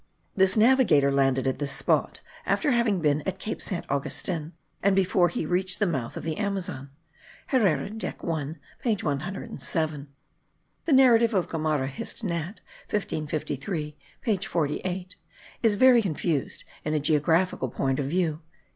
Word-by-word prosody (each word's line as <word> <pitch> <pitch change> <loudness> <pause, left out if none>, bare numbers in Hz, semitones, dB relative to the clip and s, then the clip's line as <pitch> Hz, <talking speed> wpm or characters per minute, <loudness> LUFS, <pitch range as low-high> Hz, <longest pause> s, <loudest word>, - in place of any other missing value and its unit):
This 190 +1 +3
navigator 215 - +5
landed 135 -1 +2
at 130 0 -1
this 145 -1 +1
spot, - - +1 0.3
after 295 - +2
having 230 -6 +2
been 150 -1 +2
at 190 0 -2
Cape 215 +3 -4
Saint 185 - -1
Augustin, 155 +3 -2 0.3
and 195 0 +3
before 185 -2 +3
he 165 - -3
reached 180 +3 0
the 205 - +2
mouth 135 -10 -2
of - - -6
the 160 +2 -3
Amazon. 190 -9 -3 0.6
Herrera 190 - +2
dec. 220 +1 -5
I 160 -2 -2 0.3
page 220 -5 0
107. 155 -1 -3 0.8
The 320 - +2
narrative 235 -4 +5
of 180 -3 +1
Gomara, 155 -4 0
Hist. 135 +10 -6
Nat. 170 +1 -3 0.3
1553 150 -4 -3 0.3
page 210 -7 0
48, 180 +4 -2 0.4
is 225 -3 +4
very 250 +1 +6
confused 165 -5 -2 0.2
in 155 0 -1
a - - +2
geographical 155 0 +1
point 135 +3 -1
of 140 - -1
view.) 165 -1 0
170 Hz, 145 wpm, -26 LUFS, 150-200 Hz, 0.8 s, very